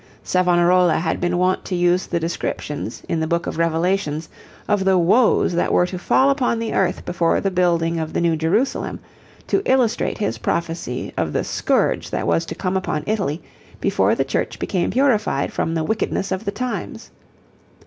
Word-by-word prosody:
Savonarola 180 Hz, -1 st, +3 dB
had 160 Hz, +1 st, -1 dB
been 175 Hz, 0 st, 0 dB
wont 185 Hz, +1 st, +1 dB
to 185 Hz, -, -2 dB
use 175 Hz, +1 st, +2 dB
the 170 Hz, -, -1 dB
descriptions, 150 Hz, -6 st, -4 dB
in 165 Hz, -, -1 dB
the 160 Hz, -, -1 dB
Book 170 Hz, +1 st, 0 dB
of -, -, -4 dB
Revelations, 165 Hz, -1 st, 0 dB, 0.4 s
of 205 Hz, -2 st, +1 dB
the 190 Hz, -1 st, +3 dB
woes 190 Hz, +3 st, +3 dB
that 175 Hz, -, 0 dB
were 180 Hz, -, +4 dB
to 180 Hz, 0 st, -5 dB
fall 265 Hz, +9 st, +3 dB
upon 260 Hz, -4 st, +1 dB
the 225 Hz, -1 st, -3 dB
earth 185 Hz, -2 st, 0 dB
before 170 Hz, -1 st, +1 dB
the 195 Hz, -, -1 dB
building 170 Hz, -2 st, +1 dB
of 160 Hz, -1 st, -3 dB
the -, -, -1 dB
new 170 Hz, -1 st, +2 dB
Jerusalem, 185 Hz, -, 0 dB, 0.5 s
to -, -, +1 dB
illustrate 255 Hz, -, +1 dB
his 115 Hz, -, -2 dB
prophecy 165 Hz, -4 st, -3 dB
of -, -, -1 dB
the -, -, 0 dB
scourge -, -, 0 dB
that -, -, -2 dB
was 85 Hz, -1 st, +1 dB
to -, -, -5 dB
come 185 Hz, 0 st, -2 dB
upon 170 Hz, -5 st, -1 dB
Italy, 195 Hz, -7 st, -2 dB, 0.4 s
before -, -, +2 dB
the -, -, 0 dB
Church -, -, -2 dB
became 180 Hz, -3 st, -1 dB
purified 225 Hz, -, +1 dB
from 165 Hz, -, -1 dB
the 160 Hz, -, 0 dB
wickedness 195 Hz, +2 st, -1 dB
of 190 Hz, +4 st, -2 dB
the 200 Hz, -, -1 dB
times. 250 Hz, +3 st, -5 dB
175 Hz, 180 wpm, -21 LUFS, 165-195 Hz, 0.5 s, were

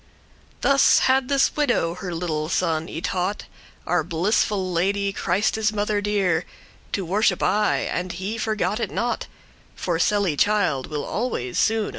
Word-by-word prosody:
Thus 275 Hz, 0 st, +5 dB
had 265 Hz, 0 st, +2 dB
this 275 Hz, -1 st, +2 dB
widow 245 Hz, -, +1 dB
her 180 Hz, 0 st, -6 dB
little 160 Hz, -2 st, -2 dB
son 165 Hz, -3 st, 0 dB
y 160 Hz, -, -6 dB
taught 185 Hz, +3 st, -2 dB, 0.4 s
Our 175 Hz, -2 st, +1 dB
blissful 185 Hz, +3 st, 0 dB
Lady, 195 Hz, +3 st, 0 dB
Christe's 210 Hz, +4 st, 0 dB
mother 210 Hz, 0 st, -1 dB
dear, 195 Hz, -5 st, +1 dB, 0.5 s
To 195 Hz, -, -1 dB
worship 195 Hz, +1 st, +1 dB
aye, 210 Hz, +1 st, +1 dB
and 180 Hz, +1 st, -2 dB
he 195 Hz, +6 st, -4 dB
forgot 215 Hz, 0 st, -1 dB
it -, -, -2 dB
not; 240 Hz, 0 st, -2 dB, 0.5 s
For 170 Hz, -3 st, -2 dB
sely* 200 Hz, -4 st, +2 dB
child 175 Hz, -8 st, +1 dB
will 150 Hz, -1 st, -4 dB
always 210 Hz, -, -2 dB
soone 220 Hz, 0 st, +2 dB
lear. -, -, -4 dB
195 Hz, 150 wpm, -23 LUFS, 170-215 Hz, 0.5 s, Thus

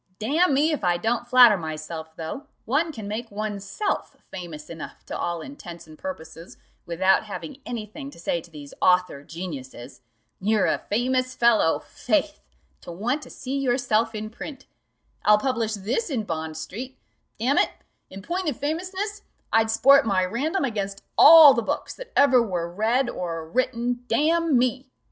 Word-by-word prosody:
"Damn 290 Hz, +7 st, +2 dB
me, 300 Hz, +4 st, +3 dB
if 300 Hz, -, -3 dB
I 175 Hz, -1 st, +2 dB
don't 235 Hz, +5 st, -1 dB
flatter 245 Hz, -4 st, +7 dB
myself, 160 Hz, 0 st, -7 dB
though, 170 Hz, -, -6 dB, 0.2 s
one 300 Hz, +8 st, +1 dB
can 220 Hz, -8 st, -8 dB
make 225 Hz, +3 st, -4 dB
oneself 205 Hz, -, -3 dB, 0.2 s
famous 165 Hz, -5 st, -8 dB
enough 165 Hz, -1 st, -9 dB
to -, -, -6 dB
all 170 Hz, -1 st, -3 dB
intents 175 Hz, -, -10 dB
and 155 Hz, -1 st, -14 dB
purposes 165 Hz, -, -8 dB, 0.3 s
without 185 Hz, +4 st, +2 dB
having 270 Hz, +7 st, -8 dB
any 235 Hz, -3 st, -4 dB
thing 275 Hz, +7 st, -9 dB
to -, -, -15 dB
say 170 Hz, 0 st, -1 dB
to 170 Hz, -, -17 dB
these 145 Hz, -3 st, -11 dB
author 180 Hz, -6 st, +2 dB
geniuses. 145 Hz, -8 st, -8 dB, 0.4 s
You're 210 Hz, +1 st, +2 dB
a -, -, +1 dB
famous 255 Hz, +4 st, -1 dB
fellow, 235 Hz, -8 st, +3 dB
faith! -, -, -2 dB, 0.4 s
to -, -, -9 dB
want 235 Hz, -, -2 dB
to -, -, -11 dB
see 265 Hz, +1 st, -6 dB
yourself 245 Hz, -4 st, +1 dB
in 215 Hz, 0 st, -5 dB
print 275 Hz, +4 st, -9 dB, 0.6 s
I'll 210 Hz, 0 st, +6 dB
publish 230 Hz, -2 st, -1 dB
this 225 Hz, -, -2 dB
in 250 Hz, -7 st, -1 dB
Bond 160 Hz, -4 st, -4 dB
street: 245 Hz, +11 st, -7 dB, 0.4 s
damn 255 Hz, +6 st, +2 dB
it, -, -, +3 dB, 0.4 s
in 195 Hz, 0 st, -10 dB
point 355 Hz, -, -2 dB
of 265 Hz, -, -4 dB
famousness, 375 Hz, +7 st, -3 dB, 0.3 s
I'd 225 Hz, 0 st, +3 dB
sport 275 Hz, +5 st, +6 dB
my 190 Hz, -5 st, +1 dB
Random 290 Hz, -, -1 dB
against 200 Hz, -5 st, -4 dB
all 320 Hz, -4 st, +10 dB
the 235 Hz, -, 0 dB
books 220 Hz, -, -3 dB
that -, -, -11 dB
ever 265 Hz, -3 st, +5 dB
were 180 Hz, -7 st, -2 dB
read 225 Hz, +8 st, 0 dB
or 165 Hz, -7 st, -4 dB
written, 245 Hz, +4 st, -1 dB
damn 325 Hz, -1 st, +2 dB
me! 255 Hz, +2 st, 0 dB
225 Hz, 165 wpm, -24 LUFS, 180-270 Hz, 0.6 s, all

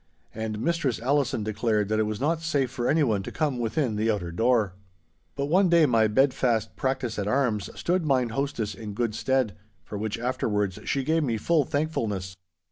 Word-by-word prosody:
And 110 Hz, -1 st, -4 dB
Mistress 160 Hz, -3 st, 0 dB
Allison 135 Hz, -2 st, +1 dB
declared 105 Hz, -1 st, 0 dB
that 110 Hz, 0 st, +1 dB
it 110 Hz, -, +2 dB
was 105 Hz, 0 st, -3 dB
not 160 Hz, +4 st, 0 dB
safe 140 Hz, -6 st, 0 dB
for 120 Hz, -2 st, -1 dB
anyone 135 Hz, -10 st, +2 dB
to -, -, -7 dB
come 145 Hz, -6 st, -1 dB
within 120 Hz, -1 st, 0 dB
the 110 Hz, +2 st, +1 dB
outer 95 Hz, -6 st, -1 dB
door. 110 Hz, +1 st, +2 dB, 0.6 s
But 140 Hz, -, -1 dB
one 180 Hz, +5 st, +3 dB
day 170 Hz, -2 st, +6 dB
my 115 Hz, -5 st, +3 dB
bed 130 Hz, +5 st, +3 dB
fast 120 Hz, -5 st, 0 dB
practice 130 Hz, -5 st, -2 dB
at 100 Hz, -, -2 dB
arms 115 Hz, -4 st, +1 dB
stood 180 Hz, 0 st, +1 dB
mine 130 Hz, -5 st, +2 dB
hostess 115 Hz, -4 st, -2 dB
in 105 Hz, +1 st, -7 dB
good 115 Hz, -1 st, -1 dB
stead, 130 Hz, -1 st, 0 dB, 0.3 s
for 105 Hz, -, -6 dB
which 110 Hz, 0 st, -2 dB
afterwards 105 Hz, -5 st, -1 dB
she 135 Hz, -, 0 dB
gave 160 Hz, +3 st, +1 dB
me 120 Hz, -5 st, 0 dB
full 155 Hz, +6 st, +2 dB
thankfulness. 110 Hz, -, -2 dB
120 Hz, 190 wpm, -26 LUFS, 110-140 Hz, 0.6 s, day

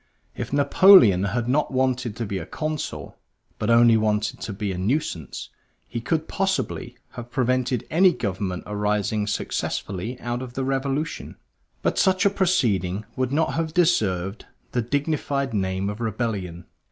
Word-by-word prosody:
If 120 Hz, 0 st, -5 dB
Napoleon 140 Hz, -, +6 dB
had 115 Hz, +4 st, -1 dB
not 145 Hz, +4 st, +1 dB
wanted 130 Hz, -3 st, 0 dB
to 115 Hz, -, -3 dB
be 100 Hz, -2 st, -3 dB
a 80 Hz, -, -6 dB
Consul, 155 Hz, -1 st, -5 dB, 0.4 s
but -, -, -1 dB
only 115 Hz, -1 st, +6 dB
wanted 110 Hz, 0 st, 0 dB
to -, -, -4 dB
be 100 Hz, 0 st, -3 dB
a 90 Hz, -, -4 dB
nuisance, 95 Hz, -, -2 dB, 0.4 s
he 115 Hz, -, -5 dB
could, 160 Hz, +7 st, -1 dB
possibly, 190 Hz, -10 st, -2 dB
have 120 Hz, -1 st, -8 dB
prevented 125 Hz, -1 st, 0 dB
any 180 Hz, +3 st, +5 dB
government 95 Hz, -, -3 dB
arising 105 Hz, 0 st, -1 dB
successfully 100 Hz, +2 st, -3 dB
out 120 Hz, +1 st, -3 dB
of 125 Hz, -2 st, -7 dB
the 135 Hz, -, -2 dB
Revolution. 135 Hz, +4 st, -2 dB, 0.5 s
But -, -, +1 dB
such 190 Hz, -1 st, +3 dB
a 200 Hz, -, +5 dB
proceeding 110 Hz, -, +1 dB
would 130 Hz, -1 st, -1 dB
not 160 Hz, +3 st, +1 dB
have 165 Hz, 0 st, -2 dB
deserved 100 Hz, -, +1 dB, 0.2 s
the 120 Hz, -, 0 dB
dignified 140 Hz, 0 st, -1 dB
name 95 Hz, -1 st, -1 dB
of 105 Hz, +3 st, -5 dB
rebellion. 105 Hz, -7 st, -3 dB
120 Hz, 150 wpm, -24 LUFS, 105-140 Hz, 0.5 s, Napoleon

